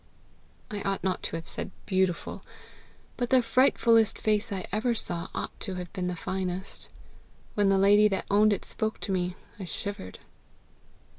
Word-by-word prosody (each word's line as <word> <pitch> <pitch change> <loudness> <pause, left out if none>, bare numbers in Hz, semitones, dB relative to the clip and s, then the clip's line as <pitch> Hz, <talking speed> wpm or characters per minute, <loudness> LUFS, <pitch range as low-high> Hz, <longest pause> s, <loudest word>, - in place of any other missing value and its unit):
"I 205 -1 -3
ought 195 0 -1
not 185 -1 0
to - - -2
have 165 0 -6
said - - -4 0.2
BEAUTIFUL. 185 -3 0 0.7
But 245 -1 -1
the 255 -2 +5
frightfullest 230 -2 +4
face 215 0 +1
I 190 -2 -3
ever 230 +4 +1
saw 175 -6 -3
ought - - -3
to 190 -3 -3
have 180 -1 -6
been 180 -1 -2
the 180 - -2
finest. 185 +2 -4 0.6
When 205 -1 +3
the 195 - +4
lady 205 +2 +6
that 195 -2 -1
owned 210 +1 +5
it 200 - -1
spoke 220 0 -2
to 200 - -2
me, 180 -1 0 0.2
I 190 - -4
shivered." 190 - -5
195 Hz, 165 wpm, -28 LUFS, 185-215 Hz, 0.7 s, lady